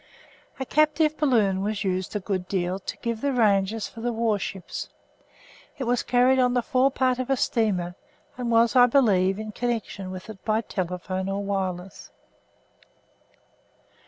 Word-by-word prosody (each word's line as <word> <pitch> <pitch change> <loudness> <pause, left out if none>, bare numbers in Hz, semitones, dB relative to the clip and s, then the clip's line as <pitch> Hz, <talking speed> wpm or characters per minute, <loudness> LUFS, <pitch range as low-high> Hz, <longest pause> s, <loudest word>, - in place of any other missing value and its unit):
A 265 - -2
captive 305 +2 +2
balloon 215 -11 +2
was 210 +1 -2
used 185 +1 -2
a - - +1
good 185 -2 -3
deal 185 0 -1
to - - -6
give 230 -2 -2
the 280 - +1
ranges 210 -3 +2
for 225 - -11
the 240 +1 -1
warships. 215 -5 -2 0.9
It 275 - -3
was 245 0 +1
carried 255 +2 +3
on 250 -1 +3
the 245 - +2
forepart 260 0 +2
of 255 0 -3
a 270 - +2
steamer 195 -8 0 0.4
and 245 -1 -3
was, 230 +1 +3
I 245 -1 +8
believe, 200 -8 +3
in 215 0 -5
connection 225 -5 -3
with 185 0 -8
it 215 -3 -11
by 220 0 +1
telephone 185 -1 -3
or 200 +1 -2
wireless. 190 -2 -4
220 Hz, 155 wpm, -25 LUFS, 190-245 Hz, 0.9 s, I